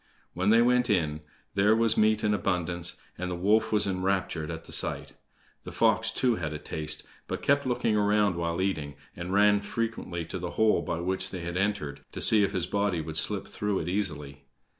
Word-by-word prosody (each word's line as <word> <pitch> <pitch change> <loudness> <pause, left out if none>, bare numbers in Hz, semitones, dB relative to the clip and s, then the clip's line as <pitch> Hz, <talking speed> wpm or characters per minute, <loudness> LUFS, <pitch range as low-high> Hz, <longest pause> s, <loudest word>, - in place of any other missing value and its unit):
When 95 +3 0
they 115 +2 +6
went 125 0 +2
in 80 -6 0 0.3
there 105 +3 +4
was 115 -1 +2
meat 110 0 +2
in 105 - +2
abundance, 90 -3 -1 0.2
and 90 0 -3
the 90 - -3
wolf 110 +5 +2
was 105 -1 +2
enraptured 95 -4 -1
at 80 -1 -6
the - - -11
sight. - - -2 0.5
The - - -9
fox, - - +2
too, 125 -3 +1
had 80 -3 -4
a - - -4
taste, 75 0 -4 0.2
but - - -5
kept 140 -1 +2
looking 120 -3 0
round 105 -2 +2
while 85 +1 -1
eating, 75 -7 -2 0.2
and 85 +1 -6
ran 105 +1 +4
frequently 105 -6 -4
to 95 - -6
the 90 0 -4
hole 110 -1 +3
by 85 0 -3
which 95 +1 -2
they 95 -2 -6
had 85 +1 -5
entered, 95 -8 -1
to - - -5
see 105 -2 +7
if 100 - 0
his 90 -3 -1
body 100 -4 0
would 80 0 -6
slip - - 0
through 105 -1 -2
it 80 - -3
easily. 75 -8 -3
95 Hz, 205 wpm, -28 LUFS, 85-105 Hz, 0.5 s, see